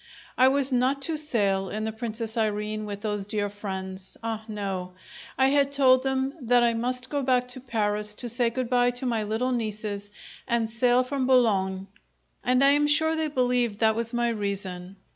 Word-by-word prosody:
I 255 - +5
was 275 0 +1
not 260 +3 +1
to 320 +2 -1
sail 205 -11 0
in 215 +1 -3
the 220 - -2
"Princess 225 0 -4
Irene" 215 -1 -1
with 205 -1 -6
those 210 -2 -3
dear 205 -1 -1
friends. 190 -2 -7
Ah 225 -1 -3
no! 195 -4 -4 0.4
I 265 0 +4
had 280 0 +2
told 260 -2 +5
them 265 0 -1
that 245 0 +3
I 235 -1 +3
must 250 +2 -2
go 285 -1 0
back 250 -1 +2
to 250 - -6
Paris 210 -3 -2
to 245 - -5
say 240 0 +1
good 255 +1 -3
bye 245 0 +3
to 260 - -5
my 230 -3 0
little 220 +5 -1
nieces 215 -3 -3 0.4
and 235 -2 +1
sail 245 +2 +2
from 260 0 -2
Boulogne 195 -7 +2 0.6
and 250 +2 +3
I 275 - +7
am 295 +1 +3
sure 320 +2 +3
they 315 -1 0
believed 250 -6 +1
that 220 0 +3
was 230 0 -2
my 240 0 +1
reason. 195 -4 -4
235 Hz, 190 wpm, -26 LUFS, 210-255 Hz, 0.6 s, I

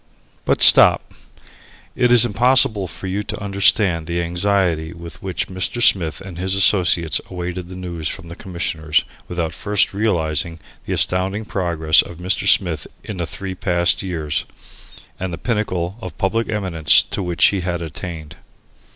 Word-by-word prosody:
But - - +3
stop - - +6 0.8
it 125 -1 +2
is 120 0 +6
impossible 120 -3 +3
for 85 - -9
you 95 +2 -2
to 105 +1 -6
understand 100 -4 +2
the 85 0 -1
anxiety 85 -2 0
with 85 0 -11
which 95 -4 -3
Mr. 95 +5 -3
Smith 90 -8 +2
and 95 -3 -9
his 95 +1 -1
associates 90 -5 +2
awaited 90 0 -6
the 90 - -9
news 85 -3 -4
from 95 -3 -8
the 85 - -9
Commissioners, 85 -4 -1 0.2
without 85 -2 -3
first 105 +2 0
realizing 85 -6 -1 0.3
the - - -3
astounding 95 +4 0
progress 85 -6 +2
of 85 - -10
Mr. 90 +2 -1
Smith - - +2 0.2
in 105 - -7
the 85 -2 -3
three 95 +1 -6
past 85 -1 0
years, 80 -6 -3 0.7
and 95 0 -4
the 85 - -5
pinnacle 95 -3 -2
of - - -8
public 110 +3 -1
eminence 90 -8 +3
to - - -5
which 90 -2 +2
he 100 - -2
had 90 -1 -3
attained. 80 -1 -8
90 Hz, 155 wpm, -19 LUFS, 85-100 Hz, 0.8 s, stop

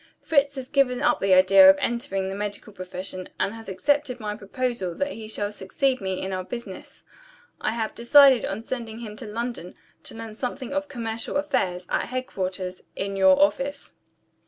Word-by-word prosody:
Fritz 280 -2 +2
has 260 -1 -7
given 265 -3 +2
up - - +3
the 195 -1 +4
idea 190 +1 +8
of 190 - +7
entering 195 -5 -2
the 190 - -4
medical 205 +1 -5
profession, 185 0 -7
and 200 - 0
has 225 -1 -9
accepted 275 +5 0
my 210 -2 -4
proposal 210 -3 -3
that 280 0 -2
he 220 -1 -8
shall 205 -1 -3
succeed 255 +6 -1
me 190 -1 -2
in 190 0 -4
our 185 0 -2
business. 215 -1 -9 0.6
I 220 - 0
have 225 -2 -2
decided 265 +1 +6
on 200 +3 -3
sending 230 -2 -5
him 220 -3 -7
to 230 - -8
London, 230 -4 -5 0.3
to - - -10
learn 225 -1 -7
something 255 +3 -5
of 290 0 -1
commercial 230 -2 -3
affairs, 185 -11 -1
at - - 0
headquarters, 185 -7 -4
in 195 0 -3
your 190 -1 +5
office. 270 +9 0
220 Hz, 180 wpm, -25 LUFS, 190-255 Hz, 0.6 s, idea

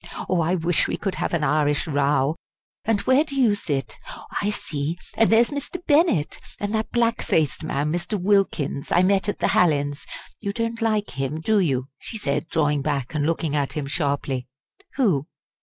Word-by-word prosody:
Oh! 180 -2 +2
I 165 +3 +1
wish 170 -1 +1
we - - -2
could 195 -2 -2
have - - -2
an 170 -3 0
Irish 145 0 +2
row! 140 -1 +1 0.5
And 215 -2 +2
where 260 +3 +4
do 275 -3 -4
you 235 -5 +5
sit? 140 - -3 0.4
I 205 - +1
see 155 -5 -3 0.2
and 225 - +3
there's 230 +3 +5
Mr. 285 +5 -4
Bennett 290 - +2 0.2
and 205 +1 -2
that 220 0 -1
black 235 0 +1
faced 155 0 0
man, 150 -1 -1
Mr. 175 +5 -2
Wilkins, 180 -7 +1
I 175 - +5
met 195 +2 +2
at - - -2
the - - +1
Hallins 145 -4 +2 0.3
you 200 -2 -3
don't 230 +1 -2
like 215 -2 0
him, 135 +3 -3
do 215 +6 +2
you?" 135 -8 +1
she 225 - -6
said, 150 -4 -1
drawing 150 -3 +1
back 140 -2 -2
and 150 -1 0
looking 160 -2 -1
at 145 -2 0
him 150 -3 -3
sharply. 140 -3 -2 0.5
"Who? 175 - +2
165 Hz, 185 wpm, -24 LUFS, 145-210 Hz, 0.5 s, you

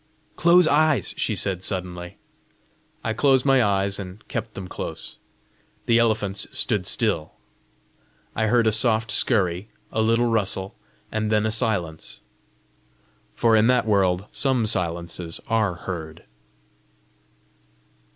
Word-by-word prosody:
"Close 175 0 +5
eyes!" 150 - +2
she - - 0
said 95 -2 -1
suddenly. 90 -1 -5 0.9
I 110 - -1
closed 135 +2 +3
my 135 -3 +4
eyes, 100 -1 +1
and 95 +2 -9
kept 110 - -5
them 95 -2 -6
close. - - -6 0.7
The 115 0 +4
elephants 110 -4 0
stood 95 -3 -1
still. 100 -10 -1 1.0
I 110 0 +1
heard 120 +1 +3
a 110 - +4
soft 110 0 +2
scurry, 100 -3 +1 0.2
a 110 - 0
little 115 +2 +2
rustle, 100 -3 -1 0.4
and 110 0 -1
then 105 0 +2
a 110 - 0
silence 100 -9 -2 1.1
for 115 -1 +3
in 110 +1 +4
that 125 -2 +3
world 95 -3 +2
SOME 130 -4 +1
silences 85 -4 -2
ARE 110 -5 +1
heard. 80 -3 -7
105 Hz, 120 wpm, -23 LUFS, 95-115 Hz, 1.1 s, Close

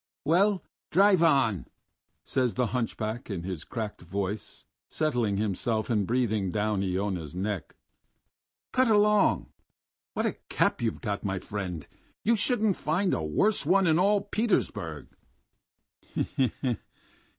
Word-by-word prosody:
"Well, 190 +5 +3 0.3
drive 195 0 +5
on," 130 - +3 0.6
says 125 -6 0
the 125 - +2
hunchback 115 -1 -2
in 95 -5 -3
his 90 -4 -4
cracked 110 -4 -5
voice, 100 +3 -4 0.2
settling 120 -10 0
himself 110 +3 -1
and 105 -4 +1
breathing 110 -6 +1
down 105 -1 0
Iona's 95 -4 -2
neck. 100 0 -3 1.0
"Cut 255 0 +3
along! 210 -1 +3 0.6
What - - 0
a - - -1
cap - - +1
you've 115 -2 -1
got, 105 -4 -3
my 95 -1 -1
friend! 90 -5 -5 0.4
You 230 +2 +4
wouldn't 220 -6 +2
find 180 +5 +1
a - - 0
worse 140 - +1
one 190 +5 +4
in 160 -1 +4
all 200 +2 +4
Petersburg...." 85 - -1
110 Hz, 120 wpm, -28 LUFS, -, 1.0 s, drive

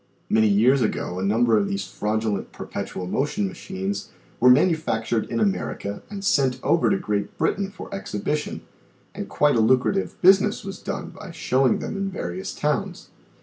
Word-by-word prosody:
Many 110 0 +4
years 120 +7 +4
ago 90 -4 -1
a - - -2
number 115 +3 +3
of 200 - 0
these 195 0 -2
fraudulent 105 -1 -2
per - - -8
petual 90 - -5
motion 150 - 0
machines 190 +2 -5 0.3
were 125 - +6
manufactured 125 - +2
in 115 - -1
America 100 0 -1
and 200 -1 -6
sent 130 -7 +2
over 170 - +3
to 195 - +2
Great 105 - -3
Britain 195 0 0
for 195 - -9
exhibition, 150 - -3 0.5
and - - -6
quite 145 -2 +3
a - - +3
lucrative 130 - +2
business 195 +3 +4
was 195 0 -7
done - - -5
by 205 - -10
showing 130 -6 +2
them - - -5
in 195 0 -2
various 95 - -5
towns. - - -2
130 Hz, 165 wpm, -24 LUFS, -, 0.5 s, were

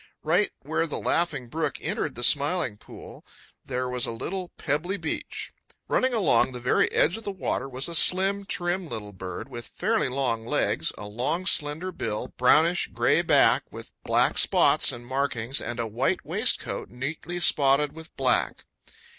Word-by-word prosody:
Right - - +2
where 165 - -1
the 150 - -4
Laughing 150 -7 -1
Brook 155 +2 -3
entered - - -3
the 120 - -5
Smiling 145 - +2
Pool - - -13 0.4
there 125 -1 -3
was 125 -1 0
a - - -3
little 180 +10 -5
pebbly 165 +6 -2
beach. - - -4 0.3
Running 260 - +1
along 190 - +3
the 125 - -6
very 125 +1 +1
edge 175 +7 +2
of 225 - -10
the - - -4
water 135 -8 -3
was 130 +1 -2
a 170 - -6
slim, 195 +4 +5
trim 175 -1 -1
little 105 -4 -6
bird 90 -1 -7
with 120 0 -9
fairly 220 -4 -1
long 125 -4 -1
legs, 115 - 0
a 105 - -8
long 130 - -2
slender 160 +2 0
bill, 105 -10 -4
brownish 160 +7 +3
gray - - +2
back - - +3
with - - -10
black - - +2
spots - - +4
and 120 0 -9
markings, 130 -1 -1
and 120 - -5
a 115 - -1
white 115 +4 -1
waistcoat - - 0
neatly 155 +8 -5
spotted 145 -3 +3
with 160 +1 -13
black. - - 0
140 Hz, 165 wpm, -26 LUFS, 120-175 Hz, 0.4 s, slim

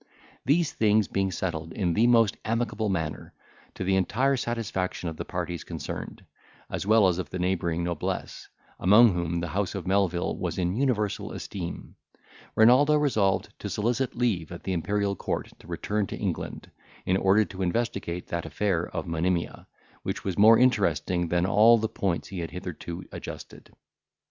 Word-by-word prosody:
These 155 +4 +2
things 105 -1 +3
being 95 0 0
settled 80 -3 -3
in 90 -4 0
the 115 +7 +4
most 115 -4 +4
amicable 110 -1 -1
manner, 80 -5 -3 0.4
to - - -4
the 95 +1 +2
entire 130 +9 +2
satisfaction 115 -8 -3
of 80 - -8
the - - -5
parties 85 -2 -4
concerned, - - -7 0.5
as - - -3
well 110 -2 +6
as 90 -1 0
of 85 -5 -4
the 95 - -4
neighbouring 85 -2 0
noblesse, 85 -2 -4 0.3
among 105 +4 +6
whom 85 -1 -1
the 85 - -3
house 100 +5 -2
of 95 -4 -4
Melvil 95 -2 0
was - - -3
in 90 -1 0
universal 115 -6 0
esteem, 90 -4 -7 0.6
Renaldo 130 +7 +6
resolved 110 -11 +1
to - - -5
solicit 120 +5 -1
leave 105 -10 0
at 85 - -8
the 95 - -2
Imperial 100 +3 0
court - - -3
to - - -16
return 105 -1 -2
to - - -6
England, - - -4 0.3
in 95 - +2
order 95 +3 +4
to 95 -1 -8
investigate 95 -3 -2
that 85 -1 -3
affair 85 +2 0
of - - -5
Monimia, 85 +1 -2 0.3
which - - -4
was 95 -3 -2
more 110 +4 +7
interesting 90 - +2
than 85 +1 +1
all 110 +5 +6
the 110 0 -1
points 95 -5 -2
he 95 - -5
had 85 - -4
hitherto 90 -1 -6
adjusted. - - -9
95 Hz, 165 wpm, -27 LUFS, 85-110 Hz, 0.6 s, more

